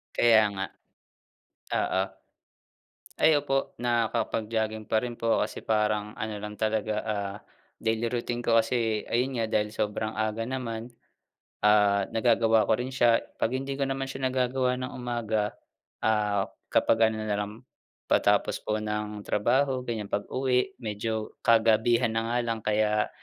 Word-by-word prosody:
Kaya 115 -2 +6
nga, 95 -1 -3 1.1
oo. 95 - +1 1.2
Ay 160 - +7
opo, 135 -1 -1
nakapag-jogging 110 -2 -1
pa - - +3
rin 120 0 -4
po 115 0 +1
kasi - - -3
parang 105 -1 0
ano 110 0 -3
lang 105 0 -7
talaga, 110 -1 0
ah, 100 -2 -3 0.4
daily 115 +1 0
routine 120 0 -2
ko. 115 -1 +4
Kasi 115 -1 0
ayun 125 +1 0
nga, 115 - +1
dahil 105 -1 0
sobrang 110 0 -2
aga 110 +1 -1
naman, 115 -2 -4 0.8
ah, 105 -2 +4
nagagawa 115 -1 +3
ko 110 - +4
rin 130 +2 -4
siya. 120 -3 +4 0.2
'Pag 125 +3 +1
hindi 135 +1 -4
ko 140 - -1
naman 135 0 -2
siya 135 -1 -2
nagagawa 125 0 +1
ng 130 0 -5
umaga, 115 -4 -2 0.4
ah, 105 -2 +1 0.2
kapag 115 0 +4
ano 110 0 -4
nalang, 105 0 -2 0.5
patapos - - +2
po 105 - -1
ng 105 -1 -4
trabaho, 130 +5 +1
ganyan, 115 -4 -4
pag-uwi 125 +5 0
medyo 110 -1 -3
kagabihan 115 +1 +4
na 115 - +1
nga 120 - +1
lang 115 -1 -1
kaya 105 0 +1
110 Hz, 140 wpm, -27 LUFS, 105-120 Hz, 1.2 s, Ay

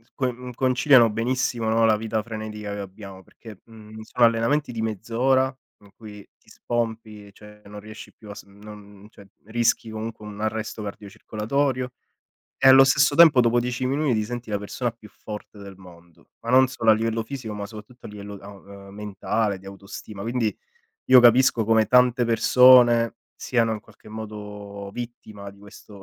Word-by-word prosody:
con 125 -1 -4
conciliano 130 -1 +4
benissimo, 120 +1 -2
no, 115 0 +3
la 110 -1 +3
vita 110 0 -3
frenetica 110 -2 -7
che 100 - -6
abbiamo, 95 -1 -10
perché, 110 -1 -15
mhmm, 110 -1 -14
sono 120 +2 +2
allenamenti 115 +6 +1
di 115 - -5
mezz'ora, 120 +5 0 0.3
in 100 - -18
cui 105 -3 -12
ti - - -26
spompi, 110 -3 -5
cioè 105 0 -16
non 105 +1 -10
riesci 110 0 -12
più 105 - -16
a 100 - -8
sm 100 0 -15
non 105 -1 -13
cioè 100 -2 -17 0.2
rischi 115 0 0
comunque 110 0 -7
un 105 -1 -10
arresto 110 0 -4
cardiocircolatorio, 115 +6 -3 0.7
e 135 - +3
allo 135 0 +9
stesso 140 +1 +3
tempo, 155 -4 +7
dopo 120 0 +2
10 125 +1 -3
minuti, 140 0 0
ti 110 - 0
senti 120 0 -7
la 105 - -1
persona 115 +4 -4
più 110 -2 -17
forte 105 +1 -10
del 100 -1 -11
mondo, 85 -2 -18
ma 115 - -7
non 130 +1 +5
solo 115 -3 -1
a - - +7
livello 115 +1 -2
fisico, 115 -2 -7
ma 105 -1 -6
soprattutto 110 +3 -13
a - - -10
livello 105 0 -10
a 100 +1 -12 0.4
ehm, - - -14
mentale, 105 0 -3
di 95 - -19
autostima 100 +1 -10
quindi, 115 -1 -2 0.5
io 130 - +9
capisco 120 -1 +4
come 110 0 +3
tante 125 -1 +3
persone 120 0 +5 0.2
siano 115 -3 -1
in 110 - -5
qualche 110 0 -19
modo 105 -2 -9
vittima 110 -4 -9
di 100 - -20
questo 100 0 -15
110 Hz, 175 wpm, -23 LUFS, 105-120 Hz, 0.7 s, allo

